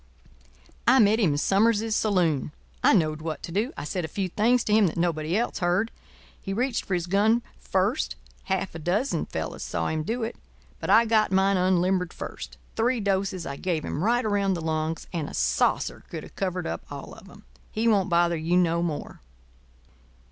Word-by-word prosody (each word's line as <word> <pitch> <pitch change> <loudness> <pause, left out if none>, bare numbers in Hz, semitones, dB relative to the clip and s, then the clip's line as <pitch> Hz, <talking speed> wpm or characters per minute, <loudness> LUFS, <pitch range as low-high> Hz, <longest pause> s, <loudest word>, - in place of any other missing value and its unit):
I 255 +2 +7
met 220 -2 +5
him 180 -10 +3
in - - -1
Summers's 215 +5 +2
saloon. 175 -11 +1 0.3
I - - +6
knowed 155 -6 +2
what 155 -1 -5
to - - -6
do. 215 - 0
I - - -4
said 175 +4 -3
a - - -2
few 190 +3 -3
things 230 +6 +2
to 210 - 0
him 215 -2 +5
that 165 - -4
nobody 170 0 0
else 235 - -1
heard. 180 +5 +1 0.5
He 195 - -4
reached 245 +3 0
for 190 - 0
his 175 -1 -1
gun 215 +6 +2 0.2
first—half 60 - -2
a 165 - -7
dozen 190 - 0
fellows - - -5
saw - - -2
him 160 0 -1
do 230 +9 -2
it—but 225 - -9
I 230 +1 +6
got 220 -3 +2
mine 190 +1 +3
unlimbered 180 0 +1
first. - - -7 0.2
Three 240 +2 +1
doses 195 -3 -1
I 140 0 -5
gave 170 -3 -2
him—right 235 - 0
around 200 -2 +1
the 170 - -4
lungs, 160 0 -2
and 160 -4 -2
a - - -7
saucer - - +1
could - - -6
have - - -13
covered 185 -2 -2
up - - -3
all - - -7
of - - -14
'em. - - -15 0.3
He 225 +2 0
won't 200 -5 +3
bother 170 -1 +3
you 165 +3 +1
no 170 -1 +2
more." 165 -4 -4
185 Hz, 190 wpm, -26 LUFS, 165-215 Hz, 0.5 s, I